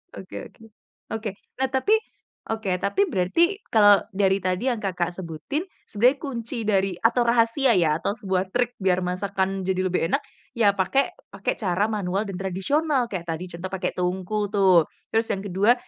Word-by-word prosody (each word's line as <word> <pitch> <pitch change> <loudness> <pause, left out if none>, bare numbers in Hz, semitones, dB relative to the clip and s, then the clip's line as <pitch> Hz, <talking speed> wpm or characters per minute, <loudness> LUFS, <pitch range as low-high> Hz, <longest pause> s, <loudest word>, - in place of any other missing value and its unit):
oke 190 - -8
oke, - - -25 0.5
oke 220 -2 -3 0.3
nah 265 - +2
tapi 265 +12 +2 0.5
oke 220 -3 -2
tapi 200 - 0
berarti 335 - +2
kalau 205 -2 +6 0.2
dari 195 0 +3
tadi 185 +7 0
yang 235 - -2
Kakak 180 -4 -1
sebutin, 180 - -4 0.2
sebenarnya 250 +7 +2
kunci 235 -3 -3
dari 195 -3 +1
atau 230 +6 +2
rahasia 235 +2 +3
ya 160 -4 +2
atau 200 - -1
sebuah 190 -4 -1
trik 245 0 0
biar 185 -2 +2
masakan 190 +1 -1
jadi 185 -1 +1
lebih 170 -2 +1
enak 285 - +1 0.3
ya 230 -4 +4
pakai 270 - +2 0.2
pakai - - -2
cara 200 +1 0
manual 200 -1 -2
dan 190 - -5
tradisional, 245 - 0
kayak 185 -5 -4
tadi 170 +2 -4
contoh 185 +2 -5
pakai 185 -1 -1
tungku 185 +3 -1
tuh, 185 -5 +5 0.2
terus 225 +1 +2
yang 195 - -3
kedua, 200 +4 +3
200 Hz, 165 wpm, -24 LUFS, 185-235 Hz, 0.5 s, kalau